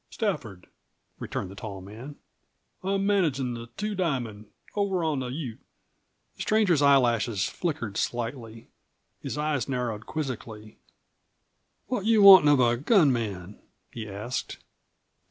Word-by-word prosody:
"Stafford," 130 - -3 0.5
returned 90 - -5
the - - -11
tall 100 -2 -7
man. 110 +10 -10 0.7
"I'm 195 +1 0
managin' 150 -11 +1
the 115 0 -7
Two 210 +1 -2
Diamond, 125 - -3 0.3
over 195 -4 0
on 155 -4 0
the 130 - -4
Ute." 125 -3 -6 0.8
The - - -8
stranger's 205 -8 +2
eyelashes 120 -7 +3
flickered 145 - -4
slightly. 115 -1 -4 0.5
His - - -5
eyes 150 -3 -1
narrowed 120 -4 -3
quizzically. 115 -8 -6 1.1
"What 245 -6 -3
you 220 -2 +5
wantin' 190 -6 +10
of 145 -2 +5
a 120 -1 +3
gun 150 - +4
man?" 100 -5 -5 0.3
he 110 -3 -7
asked. 105 +6 -5
130 Hz, 125 wpm, -27 LUFS, 115-165 Hz, 1.1 s, wantin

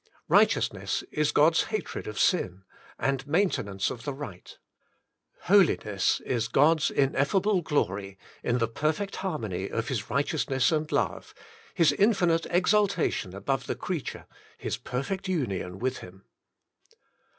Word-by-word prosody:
Righteousness - - +2
is 150 -1 +1
God's 160 +2 +4
hatred 215 -1 -4
of 105 0 -6
sin, 95 - +1 0.3
and 135 0 -1
maintenance 135 - 0
of 115 - -8
the 140 0 -4
right. 105 -11 -9 0.8
Holiness 160 - +3
is 115 -3 0
God's 150 +6 +3
in 135 -1 +2
effable 185 +7 +1
glory, 100 - -1 0.2
in 120 0 0
the 115 -1 +1
perfect 155 - -2
harmony 110 - -3
of 115 0 -3
His 115 -6 -3
right 140 +5 +1
eousness 135 -2 +1
and 155 +1 -3
love. - - -1 0.4
His 165 -6 +5
infinite 185 -6 +2
exaltation 180 - +1
above 130 +5 -2
the - - -2
creature. 175 -6 -5 0.3
His - - -3
perfect 185 +10 -4
union 100 - -2
with 130 +4 -2
him. 95 +2 -13
140 Hz, 130 wpm, -27 LUFS, 115-175 Hz, 0.8 s, His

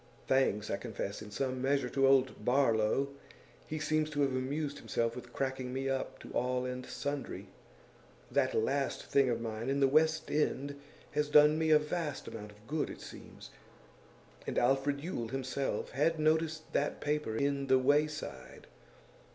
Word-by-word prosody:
Thanks, 120 -6 +2
I - - 0
confess, 105 -3 -5
in 105 - -8
some 130 +4 -2
measure, 135 -1 +1
to 135 +2 +3
old 135 -1 +3
Barlow; 125 0 +2 0.6
he 155 - -3
seems 155 0 0
to 145 -1 -1
have 140 -1 +3
amused 140 +3 -2
himself 115 0 -1
with 125 -1 -9
cracking 130 -1 -2
me 135 +1 -2
up 135 0 -2
to - - -10
all 125 +1 0
and 125 0 -4
sundry. 145 -2 -4 0.8
That - - +2
last 135 +5 0
thing 135 -2 +3
of 115 -1 0
mine 115 +1 -4
in 140 +1 +1
The 135 - +5
West 155 +2 +2
End 140 -1 -1 0.3
has 150 0 0
done 150 +1 +6
me 160 0 +1
a 155 - +8
vast 150 -1 -3
amount 105 -2 -7
of 105 +1 -20
good, 150 +4 -1
it - - -8
seems. - - -11 1.0
And - - -3
Alfred 135 +3 +2
Yule 150 -8 -3
himself 135 +2 -2
had 155 +5 +1
noticed 160 +1 +1
that 145 - 0
paper 150 -6 -1
in 140 0 0
The 130 0 +5
Wayside. 145 - 0
135 Hz, 165 wpm, -32 LUFS, 125-150 Hz, 1.0 s, a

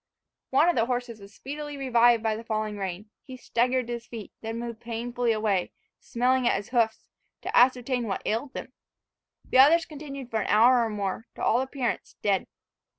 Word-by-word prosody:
One 285 +5 +4
of 350 - +3
the 230 -1 +2
horses 245 -3 -3
was 200 0 -13
speedily 290 +5 -7
revived 240 -3 +4
by 220 -1 +1
the 225 - -7
falling 215 -2 -2
rain. 195 +2 -5
He 260 -1 -10
staggered 250 +1 0
to 240 - -4
his 235 0 -7
feet, 225 -4 -8
then 225 +1 -4
moved 235 -1 -6
painfully 240 +1 -2
away, 215 -4 0 0.3
smelling 250 +1 +1
at - - +3
his 200 - -4
hoofs, 230 -3 +1 0.4
to - - -3
ascertain 250 -1 +3
what 195 - -3
ailed 245 +6 -2
them. - - -7 0.7
The 255 - +2
other 295 +5 +8
continued 275 -4 -8
for 220 -1 0
an - - -3
hour 235 +3 +5
or 225 - -1
more, 205 +1 -3
to - - -6
all 240 - +3
appearance, 265 -2 -3
dead. 200 -2 +1
235 Hz, 190 wpm, -27 LUFS, 220-255 Hz, 0.7 s, other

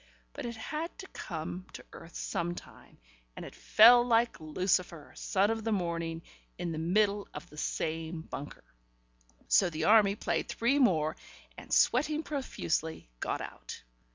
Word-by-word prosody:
But - - -5
it 235 - -5
had 310 +9 -5
to 380 - -9
come 175 +1 -6
to - - -10
earth 165 - -12
sometime, 175 +1 -5 0.4
and - - -7
it - - -10
fell 240 +3 +7
like 235 -1 +2
Lucifer, 170 0 -1
son 200 +3 +1
of 225 -1 -3
the 225 - -1
morning, 170 -4 -2 0.3
in 170 - -3
the 155 - -3
middle 200 +4 +1
of 170 - -7
the 150 - -13
same 160 +2 -3
bunker.... 145 -2 -8 0.8
So 185 - +4
the 155 -1 -4
Army 205 -2 +6
played - - -1
three 270 +5 +1
more, 160 - +3 0.4
and, - - -12
sweating 300 +5 +3
profusely, 165 - -3
got - - -2
out. - - -8
185 Hz, 150 wpm, -31 LUFS, 165-230 Hz, 0.8 s, fell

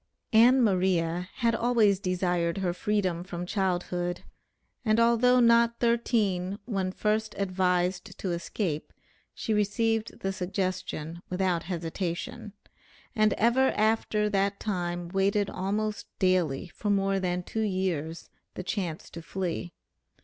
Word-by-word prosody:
Ann 245 +4 +6
Maria 180 -3 +1
had 235 -2 +1
always 230 -4 +3
desired 180 -3 0
her 185 -3 0
freedom 185 -3 -1
from 180 -1 -5
childhood, 180 -2 -1 0.6
and 215 -1 +3
although 235 +2 +5
not 235 0 +4
thirteen, 210 -6 +1
when 195 -5 -1
first 215 +2 -1
advised 180 -1 0
to 185 - -3
escape, 170 -2 -3 0.4
she 220 - -2
received 220 +2 0
the 195 0 -1
suggestion 185 -3 -3
without 180 -2 0
hesitation, 185 +6 -4 0.6
and 215 -2 +4
ever 245 +4 +3
after 215 -1 +2
that 200 0 0
time 175 -4 -2
waited 195 +2 +1
almost 210 +3 -2
daily, 180 -5 +1
for 210 - -4
more 195 -1 +2
than 180 -1 -1
two 220 - -3
years, 185 -6 -2 0.2
the 185 - -5
chance 185 -4 -3
to 170 - -8
flee. 175 0 -4
195 Hz, 120 wpm, -28 LUFS, 180-215 Hz, 0.6 s, Ann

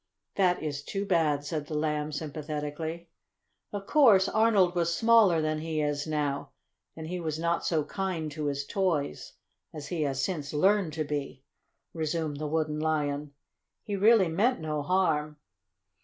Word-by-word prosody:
"That 180 -4 +2
is 145 -2 -3
too 195 +7 -4
bad," 155 -6 +1
said 150 -1 -3
the 155 - -3
Lamb 150 0 -1
sympathetically. 155 +2 -5 0.6
"Of 200 -1 -5
course 215 -9 +5
Arnold 210 -5 +3
was 170 -1 +1
smaller 220 -8 +5
than 155 0 -1
he 160 0 -3
is 145 0 -1
now, 145 -2 -2 0.5
and 160 - -7
he 180 +3 -4
was 160 -2 -3
not 170 +1 -1
so 160 -3 +1
kind 165 -2 -3
to 150 0 -3
his 140 0 -2
toys 160 - -1 0.4
as 145 -2 -8
he 170 -3 -2
has 135 -2 -1
since 155 -7 -4
learned 190 +1 +2
to 155 0 -1
be," 145 -3 -4 0.5
resumed 155 -2 -2
the 150 +1 -3
Wooden 155 0 -1
Lion. 150 -2 -1 0.5
"He 205 -3 -3
really 205 -1 +5
meant 205 +11 +1
no 155 -2 -2
harm. 150 -3 0
155 Hz, 155 wpm, -28 LUFS, 150-180 Hz, 0.6 s, course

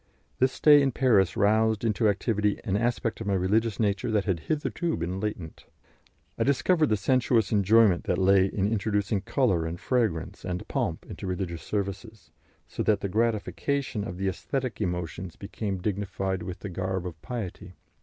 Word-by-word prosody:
This 130 0 +3
stay 145 +1 +6
in 135 -2 +1
Paris 105 -9 +3
roused 110 +1 +2
into 110 0 +2
activity 105 0 0
an 100 -5 -1
aspect 120 +1 -1
of 110 - -4
my 100 - +1
religious 105 +4 +1
nature 100 -1 0
that 105 -2 +1
had 95 -5 0
hitherto 155 - -2
been 85 +3 -3
latent. 95 -6 -5 0.7
I - - +3
discovered 155 +3 +2
the 110 - +2
sensuous 120 0 +2
enjoyment 105 -2 +4
that - - 0
lay 95 0 +4
in 100 0 -1
introducing 105 -1 0
colour 100 - +1
and 85 +1 -5
fragrance 110 -11 -1
and 90 0 -4
pomp - - -2
into - - -7
religious 90 -3 -3
services, 100 -3 -5 0.4
so - - -5
that 105 -2 +2
the 100 - -2
gratification 110 +2 -1
of 90 -3 -6
the 95 +1 -1
aesthetic 110 +8 -3
emotions 90 -1 -3
became 100 0 -4
dignified 95 -1 -2
with 90 - -7
the 105 - -5
garb 95 0 -3
of 80 -3 -7
piety. 100 -6 -6
100 Hz, 165 wpm, -27 LUFS, 95-115 Hz, 0.7 s, stay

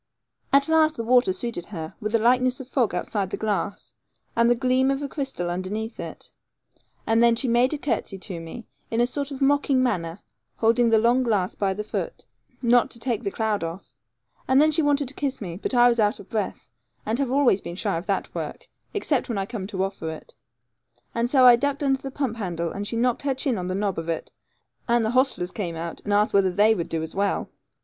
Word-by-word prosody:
At 280 0 +4
last 315 -1 +3
the 230 - -2
water 245 -3 +4
suited 185 -2 -4
her, 160 -6 -6
with 215 +1 -2
a - - +7
likeness 250 +2 +2
of 265 - -8
fog 245 -7 0
outside 195 +2 -2
the - - -4
glass, 205 -1 -3 0.4
and 235 0 +4
the 240 - +4
gleam 260 +1 +2
of 275 +1 -1
a - - -2
crystal 270 - -3
under 185 +2 -3
it, 220 +1 -6 0.7
and 225 +1 +3
then 235 0 +5
she 255 +3 0
made 240 +2 +3
a 305 - -1
curtsey 255 -8 -2
to 185 -2 -6
me, 165 +8 -9 0.2
in 225 - -1
a 240 - +5
sort 280 +3 -3
of 275 -1 -3
mocking 275 -2 +3
manner, 180 -7 -1 0.4
holding 230 +1 +3
the 225 - +5
long 235 +4 +3
glass 210 -7 0
by 195 -2 -1
the 210 - -3
foot, 350 - -5 0.4
not 240 0 +4
to 235 - -5
take 235 -1 -2
the 200 - -1
cloud 215 -2 -1
off; 165 +3 -7 0.5
and 260 +1 +4
then 310 +1 +5
she 315 +2 +2
wanted 290 -2 +1
to 265 - -3
kiss 280 -2 -2
me; 175 -5 -6
but 215 +7 -1
I 245 0 +7
was 235 -1 +2
out 210 -1 +2
of 195 - -13
breath, 215 -2 -3 0.3
and 225 +4 -1
have 275 -3 0
always 260 -7 +3
been 170 - -7
shy 200 0 -1
of 170 +5 -5
that 195 -2 -1
work, - - -6 0.3
except 300 -12 0
when 230 - -2
I 195 - -1
come 205 -3 -5
to 190 -2 -2
offer 195 -4 -4
it; 160 - -9 0.8
and 235 +1 0
so 260 -1 +5
I 245 -1 +10
ducked 285 +3 -1
under 270 -1 +1
the 270 - -5
pump 265 -4 -3
handle, 170 -5 -3
and 205 +1 -4
she 230 - -4
knocked 240 +1 +1
her 275 -2 0
chin 260 -1 0
on 180 - -4
the 185 - -2
knob 195 -3 -1
of 165 0 -6
it; 165 - -3 0.6
and 235 -1 +2
the 220 - 0
hostlers 255 -8 +1
came 175 -5 -4
out, 165 +1 -6
and 205 - -3
asked 205 +1 +3
whether 195 -1 +4
they 210 +4 +4
would 170 -5 -3
do 160 -1 -2
as 160 - -6
well. 200 0 -1
230 Hz, 235 wpm, -24 LUFS, 195-255 Hz, 0.8 s, I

